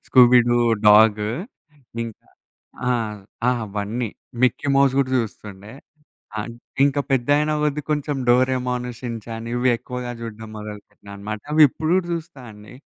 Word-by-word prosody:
Scooby 125 -1 +7
Doo 120 - +3 0.3
డాగు. 105 0 +6 0.7
ఇంకా. 115 -2 -9 0.6
ఆ! - - +2 0.6
ఆ! - - +6 0.2
అవన్నీ 105 +4 -3 0.3
'మిక్కీ 130 +3 +2
మౌస్' 135 -1 +4
గూడా 135 -2 +1
జూస్తుండే. 105 -3 -5 0.7
అన్ 115 +2 -6 0.3
ఇంకా 140 0 +1
పెద్ద 130 -1 +1
అయిన 150 +1 +1
కొద్ది 150 0 0
కొంచెం 150 -1 -1
'డోరేమోన్ 125 0 +2
షిన్‌చాన్' 115 -2 -6
ఇవి 120 +1 +1
ఎక్కువగా 125 +1 -6
జూడడం 110 -1 -8
మొదలుపెట్టినా 105 -1 -10
అనమాట. 105 +1 -6
అవి 155 +1 +6
ఇప్పుడు 155 +4 -3
గూడా 185 -2 +1
చూస్తా 165 -3 -6
అండి. 105 +3 -14
120 Hz, 135 wpm, -22 LUFS, 105-135 Hz, 0.7 s, Scooby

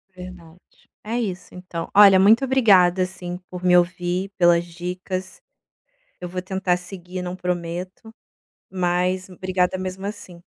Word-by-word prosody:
Verdade. 180 -2 -14
É 230 +3 -2
isso, 190 -6 -5
então. 180 -2 -7
Olha, 200 -2 +8
muito 220 +7 +5
obrigada, 195 -9 +4
assim, 180 -1 -6
por 180 0 -8
me 180 -1 +5
ouvir, 180 +1 -1
pelas 175 -1 +4
dicas, 180 +2 -6 0.8
eu 180 - -6
vou 180 +1 -5
tentar 190 -1 -1
seguir, 180 0 -8
não 180 0 -5
prometo, 180 +4 -5 0.6
mas, 185 0 -1
obrigada 185 0 -1
mesmo 185 +1 -5
assim. 185 -4 -9
180 Hz, 130 wpm, -22 LUFS, 180-190 Hz, 0.8 s, Olha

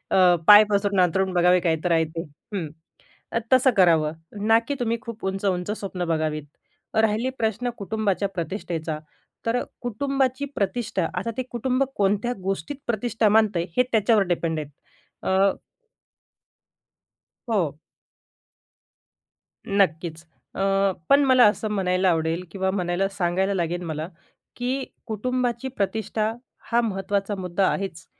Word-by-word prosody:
अ, 180 -2 +6
पाय 210 0 +10
पसरून 200 -1 +1
अंथरून 185 +2 +1
बघावे, 180 +1 +4
काही 165 -2 +1
तर 180 - +1
आहे 165 -1 +4
ते, 165 +1 -5 0.3
हं, 170 -5 -2 0.7
ते - - +3
तसं 260 +1 +6
करावं. 165 -5 +4 0.3
ना 225 +1 +6
की 285 - 0
तुम्ही 230 -1 0
खूप 230 -4 -8
उंच-उंच 190 -1 -1
स्वप्न 185 -3 -4
बघावीत. 155 -2 -1 0.5
राहिले 220 +3 +2
प्रश्न 225 +2 -1
कुटुंबाच्या 200 -2 -1
प्रतिष्ठेचा, 165 -3 -3 0.5
तर 230 +2 +2 0.2
कुटुंबाची 265 +3 -1
प्रतिष्ठा 215 +3 -1
आता 230 - -2
ते 255 - -1
कुटुंब 255 +2 0
कोणत्या 205 +4 +1
गोष्टीत 195 +10 -3
प्रतिष्ठा 230 -1 +1
मानतंय? 210 -5 +3
हे 250 - +6
त्याच्यावर 215 -1 +4
डिपेंड 165 -2 -1
आहे. 150 - -4 0.7
अ 195 +1 +4 2.0
हो. 175 -10 0 1.9
नक्कीच, 170 -5 0 0.3
अ, 195 0 +2 0.2
पण 280 +1 +6
मला 255 -2 +6
असं 210 +1 0
म्हणायला 185 -2 +1
आवडेल 165 +1 0
किंवा 190 0 -1
म्हणायला 185 0 0
सांगायला 190 0 0
लागेल 175 -1 -1
मला 155 -1 -4 0.5
की 255 +2 -2 0.2
कुटुंबाची 245 +3 -2
प्रतिष्ठा 215 -1 -1 0.4
हा 235 +1 +4
महत्त्वाचा 200 -1 -1
मुद्दा 185 0 0
आहेच, 185 -3 -3
195 Hz, 125 wpm, -24 LUFS, 180-225 Hz, 2.0 s, पाय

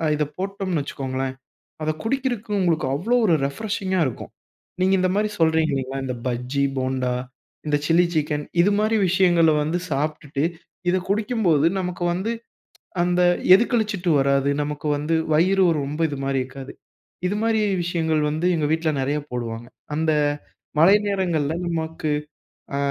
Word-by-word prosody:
இத 150 - +1
போட்டோம்ன்னு 190 -4 -2
வச்சுக்கொள்ளுங்களேன். 130 -1 -4 0.5
அத 155 - +1
குடிக்கறதுக்கு 240 -3 -2
உங்களுக்கு 165 -6 +1
அவ்வளோ 215 - 0
ஒரு 170 -6 +4
ரிப்ரஷிங்கா 190 +4 -2
இருக்கும். 120 - -7 0.5
நீங்க 190 +1 +3
இந்த 185 - +2
மாரி 210 +1 +1
சொல்றீங்க 160 -1 +3
இல்லைங்களா 135 0 -3
இந்த 125 - -3
பஜ்ஜி 125 +3 -1
போண்டா, 130 -1 -1 0.5
இந்த 150 - +2
சில்லி 170 +2 +4
சிக்கன் 150 -1 0 0.2
இது 200 - +3
மாரி 215 +1 +2
விஷயங்கள 175 -3 +4
வந்து 160 +4 -1
சாப்பிட்டுட்டு 145 0 -2 0.5
இதை 185 +1 +2
குடிக்கும்போது, 205 - +2
நமக்கு 180 -1 -3
வந்து, 190 +6 -2 0.7
அந்த 180 0 +2 0.3
எது 215 - +4
கழிச்சுட்டு 210 -6 0
வராது 140 0 +2
நமக்கு 150 +1 -4
வந்து 150 +3 0 0.2
வயிறு 185 +5 +4 0.2
ரொம்ப 145 +3 -5
இது 145 - -4
மாரி 135 0 0
இருக்காது. 130 +1 -9 0.5
இது 200 - -1
மாரி 225 -1 +2 0.2
விஷயங்கள் 160 -3 0
வந்து 155 +3 -2
எங்க 155 - 0
வீட்ல 160 0 +1
நிறைய 140 +3 0
போடுவாங்க. 120 -1 -4 0.3
அந்த 160 +1 +1 0.7
மழை 185 +5 +7
நேரங்கள்ல 175 -7 0
நமக்கு 160 -1 -3 0.7
ஆ - - -1
160 Hz, 140 wpm, -23 LUFS, 140-190 Hz, 0.7 s, மழை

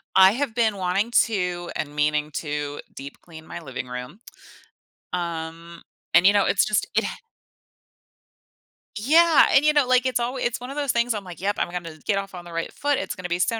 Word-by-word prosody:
I 190 0 +8
have 245 -1 -2
been 220 -4 +1
wanting 190 +5 0
to 180 -5 -3
and 145 -1 -4
meaning 150 0 0
to 145 -1 -4 0.2
deep 140 +1 -8
clean 160 -2 -13
my 175 - -7
living 130 -3 -6
room, 125 - -7 0.9
um, 170 -1 -5 0.3
and, 175 +3 +6
you 200 - +6
know, 205 -1 +3
it's 195 - +3
just 215 - 0
it - - +3
ha - - -4 1.8
Yeah, 315 +8 +5
and, 275 - +6
you 300 - +5
know, 290 -3 +3
like, 255 0 +3
it 255 - -1
alw 245 +2 -2
it's 240 0 -1
one 250 +2 -7
of 275 - -7
those 285 -3 0
things, 235 0 +1
I'm 210 -2 -5
like, 180 -2 -10
"Yep, 200 +2 -1
I'm - - 0
gonna 170 -3 -6
get 205 - +1
off 195 0 -4
on 180 -1 -8
the 175 - -11
right 165 0 -3
foot. 285 -1 0
It's - - -4
gonna 185 -2 -7
be 175 0 -1
so 225 +4 +1
190 Hz, 210 wpm, -24 LUFS, 165-235 Hz, 1.8 s, I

